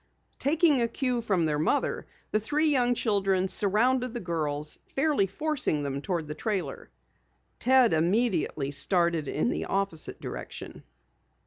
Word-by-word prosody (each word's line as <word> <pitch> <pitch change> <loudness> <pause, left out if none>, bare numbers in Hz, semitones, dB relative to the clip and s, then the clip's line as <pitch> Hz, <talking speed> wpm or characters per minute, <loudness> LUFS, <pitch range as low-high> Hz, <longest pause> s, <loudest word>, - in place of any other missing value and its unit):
Taking 300 -2 +3
a 235 - +2
cue 250 0 -1
from 190 -7 +1
their 150 -1 0
mother, 220 - 0 0.2
the 215 - +2
three 300 +8 +1
young 245 -4 +2
children 195 -4 +1
surrounded 240 +6 +2
the - - -2
girls, 155 -5 -3 0.2
fairly 275 -7 +2
forcing 255 - -1
them 140 0 -3
toward 170 -2 -2
the 150 - -4
trailer. 195 +3 -4 0.7
Ted 255 -3 +5
immediately 170 - +1
started 170 -1 +1
in 240 - 0
the - - -3
opposite 195 -5 -2
direction. - - -8
200 Hz, 135 wpm, -28 LUFS, 165-250 Hz, 0.7 s, Ted